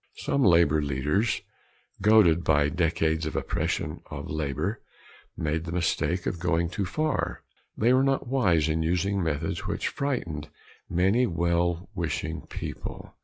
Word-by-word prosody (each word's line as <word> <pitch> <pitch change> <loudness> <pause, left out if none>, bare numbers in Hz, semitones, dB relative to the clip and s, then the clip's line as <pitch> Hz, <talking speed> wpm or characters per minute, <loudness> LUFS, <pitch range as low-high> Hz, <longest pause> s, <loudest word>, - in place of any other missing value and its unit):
Some 140 - -1
labor 85 - +5
leaders 75 - 0 0.6
goaded 100 -5 +5
by 75 -2 +3
decades 80 -1 0
of - - -5
oppression - - -2
of - - -6
labor 75 - -2 0.6
made 80 +1 -1
the 85 - -5
mistake 90 +1 0
of 90 - -2
going 85 -1 +1
too 100 - -2
far. 155 - -1 0.3
They 120 +4 +4
were 130 - +5
not 135 0 +1
wise 95 - +2
in 80 +1 0
using 90 +4 0
methods 85 +5 -2
which 100 - -1
frightened 85 - -3 0.4
many 95 +8 +3
well 85 0 0
wishing 80 +1 -3
people. - - -7
85 Hz, 135 wpm, -27 LUFS, 80-100 Hz, 0.6 s, labor